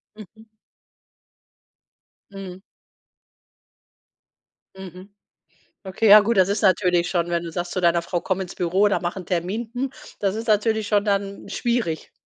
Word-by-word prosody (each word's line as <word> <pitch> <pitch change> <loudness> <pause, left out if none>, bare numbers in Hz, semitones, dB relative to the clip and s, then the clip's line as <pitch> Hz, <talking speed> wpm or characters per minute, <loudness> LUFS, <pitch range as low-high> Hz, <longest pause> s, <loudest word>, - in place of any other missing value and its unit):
Mhm. 220 +1 -15 1.8
Mhm. 190 -1 -9 2.1
Mhm. 190 +1 -11 0.8
Okay, 195 +3 0
ja 210 +1 +10
gut, 225 +1 0
das 190 0 +4
ist 205 +1 -1
natürlich 180 -2 +2
schon, 175 -2 -1
wenn 170 0 0
du 170 - -6
sagst 175 +1 -4
zu 185 - -2
deiner 170 -1 +2
Frau 175 0 -3
„komm 190 0 -2
ins 185 -1 -6
Büro, 185 +4 +1
da - - 0
mach 175 +1 -4
'n 180 -3 -7
Termin”, 190 +6 -3
hm, 260 +1 -2 0.3
das 200 0 0
ist 225 +1 -5
natürlich 220 0 +1
schon 205 0 +1
dann 200 -1 -2
schwierig. 220 -6 -2
195 Hz, 145 wpm, -22 LUFS, 180-210 Hz, 2.1 s, ja